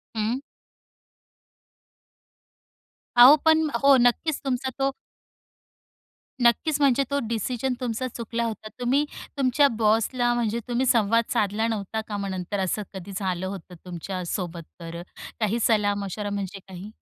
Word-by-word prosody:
हं. 220 +4 0 2.8
अहो 250 +5 +10
पण 315 -1 +4
हो, 275 -1 +7
नक्कीच 250 +5 +2
तुमचा 265 0 -1
तो 270 0 +2 1.5
नक्कीच, 280 +6 +3
म्हणजे 275 0 +4
तो 280 - +1
डिसिजन 245 +3 -1
तुमचा 250 +1 -2
चुकला 235 -1 -4
होता. 220 -1 -5
तुम्ही 265 +4 +2 0.3
तुमच्या 275 +2 +4
बॉसला, 230 +3 +2
म्हणजे 235 -1 0
तुम्ही 245 +2 0
संवाद 230 -1 +3
साधला 210 +2 +1
नव्हता 220 0 -3
का 205 -1 -4
मग 200 -1 -3
नंतर 185 +2 -3
असं 190 +3 -1
कधी 190 0 -8
झालं 185 -2 -2
होतं 190 -2 -8
तुमच्या 180 +1 -5
सोबत 170 -2 -4 0.2
तर, 170 0 -7 0.4
काही 225 +1 0
सलाह 210 -3 +2
मशवरा 205 +2 -4
म्हणजे 200 -1 -4
काही? 190 +3 -9
225 Hz, 130 wpm, -25 LUFS, 200-250 Hz, 2.8 s, अहो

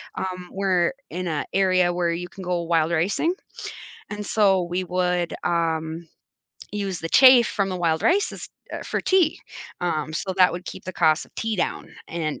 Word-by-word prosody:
um, 180 -1 -5
we're 190 0 +1 0.2
in 180 0 -4
a 155 -3 -2
area 185 -2 +3
where 175 -1 0
you 175 +1 -4
can 190 - -10
go 175 -1 -1
wild 165 -1 +1
ricing- 195 - +1 0.8
and 210 0 -5
so, 195 -3 +3
we 175 +2 -2
would, 180 -1 0
um, 165 -1 -1 0.7
use 200 -3 -3
the 165 - -4
chaff 255 +2 +8
from 200 -1 -1
the 185 - -2
wild 165 -2 0
rices, 400 +5 +1 0.2
uh, - - -4
for - - -2
tea. 365 -5 +2 0.4
Um, 155 -3 -1
so 190 +4 -2
that 185 -2 +5
would 175 +1 -6
keep - - -8
the 185 - -5
cost 155 -2 +2
of - - -28
tea 225 0 -1
down - - -3
and 160 -3 -3
180 Hz, 180 wpm, -24 LUFS, 170-195 Hz, 0.8 s, chaff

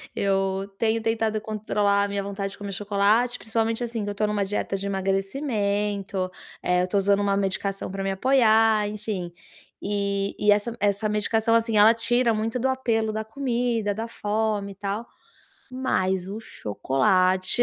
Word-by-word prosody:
eu 195 0 0
tenho 225 0 +1
tentado 220 -1 0
controlar 205 -2 +1
a 205 - 0
minha 200 0 -2
vontade 200 0 -4
de - - -13
comer 200 -1 -6
chocolate, 205 +4 +1
principalmente 225 +1 -1
assim, 230 -2 -3
que 205 - -3
eu - - -3
estou 210 +1 0
em - - -1
uma 205 -1 0
dieta 195 0 -2
de 195 0 -4
emagrecimento, 200 -1 -1 0.3
eh, 180 0 +2
eu - - +1
estou 190 +2 -1
usando 200 +1 +3
uma 200 -1 +1
medicação 195 0 -2
para 195 0 -4
me 195 - 0
apoiar, 220 -1 +4
enfim, 205 -4 -4 0.5
e 200 -1 -1
e 210 0 +4
essa 210 +3 +1
essa 200 +1 +1
medicação, 220 +2 +1
assim, 225 -1 +2
ela 215 +2 +8
tira 235 +1 +2
muito 225 +3 -1
do 260 - +1
apelo 230 -4 0
da 220 0 -2
comida, 235 -3 -1
da 225 +3 -4
fome 210 -2 -1
e - - -11
tal, 200 +3 -4 0.7
mas 190 -8 0
o 210 +3 -5
chocolate 185 - +1
205 Hz, 170 wpm, -25 LUFS, 195-225 Hz, 0.7 s, ela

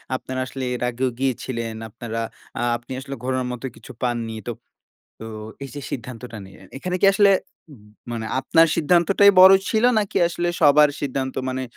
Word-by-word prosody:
আপনারা 130 0 -5
আসলে 130 0 -6
এর - - -7
আগেও 125 +2 -1
গিয়েছিলেন 115 -3 -2
আপনারা 115 +1 -6 0.4
এ্যাঁ 120 0 0
আপনি 120 +2 -16
আসলে 135 0 -7
ঘোরোর 130 -1 -1
মত 125 +1 -7
কিছু - - -13
পাননি। 120 -2 -2
তো, - - -1 0.7
তো 110 - -9 0.4
এই - - -7
যে 145 - -6
সিদ্ধান্তটা 120 -2 -7
নিলেন। 95 - -16
এখানে 180 +4 -2
কি 195 - +5
আসলে 200 0 +5 0.8
মানে 110 -1 -4
আপনার 165 +4 +4
সিদ্ধান্তটাই 180 +5 +5
বড় 190 +1 +10 0.2
ছিল, 220 +1 +1
নাকি 210 0 -3
আসলে 175 0 -2
সবার 150 0 +6
সিদ্ধান্ত 130 -1 -3
মানে 130 0 -3
130 Hz, 165 wpm, -22 LUFS, 120-165 Hz, 0.8 s, বড়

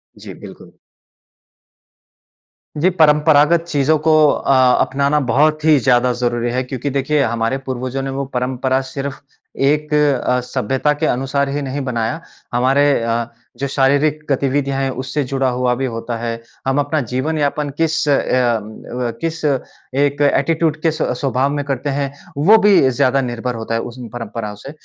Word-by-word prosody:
जी, - - -10
बिल्कुल। - - -13 2.0
जी 160 +5 +2
परंपरागत 150 +1 +4
चीज़ों 150 0 +2
को 160 - +5 0.2
अ, - - 0 0.3
अपनाना 140 +2 +1
बहुत 155 +2 +2
ही 155 -2 +6
ज़्यादा 125 -1 +3
ज़रूरी 120 -1 -1
है। 130 +1 -1
क्योंकि 130 +2 -4
देखिए, 140 +2 0
हमारे 115 +2 -1
पूर्वजों 130 +1 -3
ने 135 - -4
वो 140 - -2
परंपरा 130 +1 0
सिर्फ़ 140 -3 -5 0.4
एक 150 +2 +1
अ, 140 -4 +2
सभ्यता 130 +5 -1
के 150 +2 -2
अनुसार 135 +2 0
ही 145 +1 -2
नहीं 140 +1 -4
बनाया, 120 +5 -2 0.3
हमारे 130 +4 +3 0.2
अ, 115 0 0 0.3
जो 140 - -2
शारीरिक 140 +3 +2
गतिविधियाँ 140 0 0
हैं 135 - 0
उससे 140 +2 -2
जुड़ा 135 0 -1
हुआ 125 0 0
भी 135 +2 -2
होता 115 -1 -4
है। 115 0 -4 0.3
हम 135 +1 +1
अपना 145 +2 0
जीवन 155 +5 -1
यापन 145 0 -1
किस 160 -1 0
अ - - +4
अ, 120 -4 +1 0.6
किस 165 -1 -3
एक 140 +1 -2
एटीट्यूड 160 -1 0
किस 160 -1 0
स्वभाव 130 +1 0
में 145 0 -2
करते 140 +1 -2
हैं, 140 0 -2 0.3
वो 200 +10 +6
भी 200 -10 +5
ज़्यादा 130 +2 +2
निर्भर 120 0 -3
होता 115 0 -5
है 115 - 0
उस 120 +1 -8
म 120 - -7
परंपराओं 115 -3 -5
से। 135 +7 -10
135 Hz, 160 wpm, -18 LUFS, 125-150 Hz, 2.0 s, ही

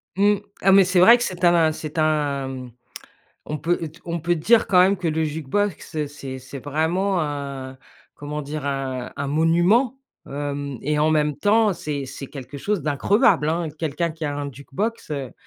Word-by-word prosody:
Mmh. 205 +2 +4 0.3
Ah, 195 - +5
mais 195 0 +7
c'est 185 0 +2
vrai 230 +7 +8
que 240 - -2
c'est 180 -1 -5
un 170 -2 +5
c'est 155 0 -7
un, 150 -3 +1
mmh, 130 -2 -7 0.8
on 150 - -3
peut 170 +5 +1
d 160 +2 -17
on 170 0 -3
peut 175 +2 +1
dire, 220 +9 +3
quand 185 - +4
même, 195 +2 +4
que 175 -2 -2
le 160 0 0
jukebox, 155 +1 -2
c'est 135 -2 -8
c'est 130 +2 -9
vraiment 170 +7 0
un 140 -3 -5 0.4
comment 150 +1 -5
dire? 150 +1 -5
Un 135 -3 -3
un 140 - -3
monument, 175 - +2 0.3
hem 140 -2 -4
et 150 0 0
en 155 +1 +3
même 150 -2 +1
temps, 215 0 +3
c'est 145 -5 -4
c'est 135 - -8
quelque 140 0 -9
chose 205 +4 -1
d'increvable, 155 - +3
hein. 165 +1 -1
Quelqu'un 160 +1 -2
qui 160 0 -7
a 145 -1 -2
un 145 0 -3
jukebox, 155 - -4
heu, 140 -4 -4
155 Hz, 185 wpm, -23 LUFS, 140-175 Hz, 0.8 s, vrai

